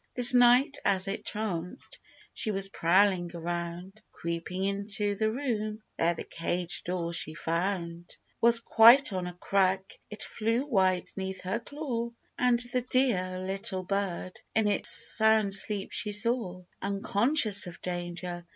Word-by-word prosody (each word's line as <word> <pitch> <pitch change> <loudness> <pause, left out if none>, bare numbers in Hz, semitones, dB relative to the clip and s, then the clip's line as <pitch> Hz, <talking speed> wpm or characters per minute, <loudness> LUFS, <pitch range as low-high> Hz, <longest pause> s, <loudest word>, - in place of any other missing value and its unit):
This 245 +1 +10
night, 250 +4 +3
as 195 -1 +3
it 195 - -5
chanced, 180 -5 -5 0.3
she - - -2
was 195 -1 +1
prowling 185 0 +1
around; 175 +4 -7
Creeping 170 +3 -6
into 200 +1 -1
the 215 +2 -2
room, 220 -4 -4
there 170 +1 0
the - - -7
cage 175 +1 -3
door 170 -1 -4
she 155 -2 -1
found 170 0 -4 0.2
Was 235 0 +6
quite 235 +1 +5
on 185 -1 -4
a 180 - -8
crack; 190 +1 -2
it 210 - -3
flew 230 +4 -2
wide 190 -8 0
'neath 190 -1 -6
her 190 +5 -4
claw, 240 -3 -6 0.3
And 250 -1 +1 0.2
the 250 - 0
dear 235 -8 -1
little 195 0 -2
bird 185 -1 -5
in 220 -1 +1
its 205 - +4
sound 220 -2 +4
sleep 200 0 +1
she 210 - -1
saw, 210 -4 +2 0.2
Unconscious 205 +2 +3
of 175 - -11
danger 175 0 -6
195 Hz, 140 wpm, -27 LUFS, 180-220 Hz, 0.3 s, This